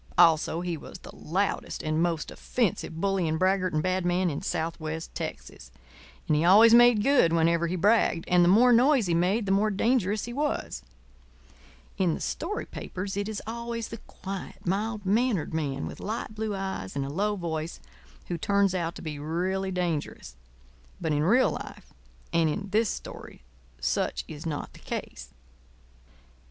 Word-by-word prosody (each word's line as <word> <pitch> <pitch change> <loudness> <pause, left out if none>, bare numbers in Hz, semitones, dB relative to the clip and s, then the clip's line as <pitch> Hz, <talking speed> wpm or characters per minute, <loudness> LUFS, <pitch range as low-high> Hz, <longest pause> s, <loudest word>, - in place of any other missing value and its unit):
Also 160 0 +4
he 175 -2 -3
was - - -10
the - - -13
loudest 190 +5 -2
and 155 +1 0
most 170 -3 -1
offensive 185 -8 -2
bully 195 -2 +1
and 160 0 0
braggart 185 +1 +2
and 155 0 0
bad 185 0 0
man 175 0 +1
in 140 - -4
southwest 160 0 -3
Texas. - - -7 0.6
And 155 - +3
he 150 - +2
always 215 +6 +7
made 240 -3 +7
good 275 -11 +4
whenever 170 +1 +2
he 175 - -2
bragged; 190 -2 +2
and 180 -1 +5
the - - +4
more 240 +6 +6
noise 255 0 +4
he 175 - 0
made 185 +6 +1
the 195 - -1
more 205 +2 +3
dangerous 210 -1 +1
he 240 - -6
was. 295 +3 -2 1.2
In 180 -4 +2
the - - -6
story 410 +7 -3
papers 190 +1 -6
it 200 +1 -2
is 215 - -5
always 235 0 -4
the 230 - -7
quiet, 195 0 -8
mild 205 +3 -1
mannered 210 -4 +1
man 140 -4 -2
with - - -7
light 215 0 -4
blue 215 -1 -3
eyes 190 - -4
and 140 -1 -1
a - - -5
low 205 +7 0
voice 165 -3 -4 0.5
who 175 -2 -3
turns 200 +1 +2
out 170 -2 -2
to - - -9
be 150 -3 -5
really 185 +5 -1
dangerous; 165 - -3 0.6
but 160 - -2
in 145 - +1
real 230 +11 +4
life - - -8 0.4
and 165 -1 +3
in 200 +6 -3
this 220 +1 +2
story - - -8 0.4
such - - -1
is 155 +2 -7
not 150 -2 -4
the - - -14
case. - - -6
185 Hz, 170 wpm, -27 LUFS, 165-210 Hz, 1.2 s, always